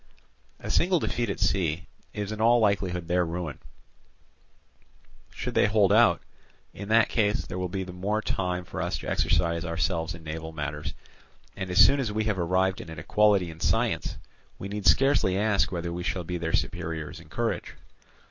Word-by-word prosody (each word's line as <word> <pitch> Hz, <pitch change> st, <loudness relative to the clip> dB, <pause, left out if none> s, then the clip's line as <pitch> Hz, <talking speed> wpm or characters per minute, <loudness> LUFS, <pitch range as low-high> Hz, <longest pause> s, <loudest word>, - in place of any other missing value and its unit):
A -, -, -5 dB
single 180 Hz, +1 st, +3 dB
defeat 120 Hz, -7 st, -1 dB
at 100 Hz, -, -3 dB
sea 90 Hz, -4 st, 0 dB, 0.3 s
is 105 Hz, 0 st, -4 dB
in 110 Hz, 0 st, -4 dB
all 120 Hz, +2 st, +5 dB
likelihood 95 Hz, -5 st, 0 dB
their 90 Hz, +1 st, +2 dB
ruin: 85 Hz, -4 st, -4 dB, 1.7 s
should -, -, -5 dB
they -, -, +4 dB
hold 105 Hz, -1 st, +3 dB
out, 115 Hz, +2 st, +5 dB, 0.5 s
in 100 Hz, +1 st, -8 dB
that 115 Hz, 0 st, +5 dB
case 105 Hz, -2 st, +1 dB
there 90 Hz, -, -5 dB
will 90 Hz, 0 st, -2 dB
be 95 Hz, +1 st, -3 dB
the 90 Hz, -1 st, -8 dB
more 100 Hz, +4 st, -1 dB
time 90 Hz, -4 st, -2 dB
for -, -, -5 dB
us -, -, -1 dB
to -, -, -8 dB
exercise 85 Hz, -1 st, +1 dB
ourselves 85 Hz, 0 st, -1 dB
in 80 Hz, -, -12 dB
naval 80 Hz, +1 st, -6 dB
matters; 75 Hz, -1 st, -4 dB, 0.6 s
and 95 Hz, -2 st, -5 dB
as 90 Hz, -, -2 dB
soon 140 Hz, +7 st, +3 dB
as 120 Hz, -6 st, -1 dB
we 110 Hz, +1 st, -1 dB
have 105 Hz, -3 st, -1 dB
arrived 95 Hz, +2 st, +1 dB
at -, -, -10 dB
an 80 Hz, -, -8 dB
equality 100 Hz, +2 st, +2 dB
in 80 Hz, -, -13 dB
science, -, -, 0 dB, 0.4 s
we 100 Hz, -, -6 dB
need 100 Hz, -1 st, -3 dB
scarcely 95 Hz, -, +4 dB
ask 105 Hz, -1 st, +2 dB
whether 85 Hz, -1 st, -3 dB
we 90 Hz, -, -4 dB
shall 90 Hz, 0 st, -2 dB
be 90 Hz, +1 st, -4 dB
their 80 Hz, -1 st, -2 dB
superiors 80 Hz, -3 st, -2 dB
in -, -, -16 dB
courage. -, -, -3 dB
90 Hz, 185 wpm, -27 LUFS, 85-105 Hz, 1.7 s, all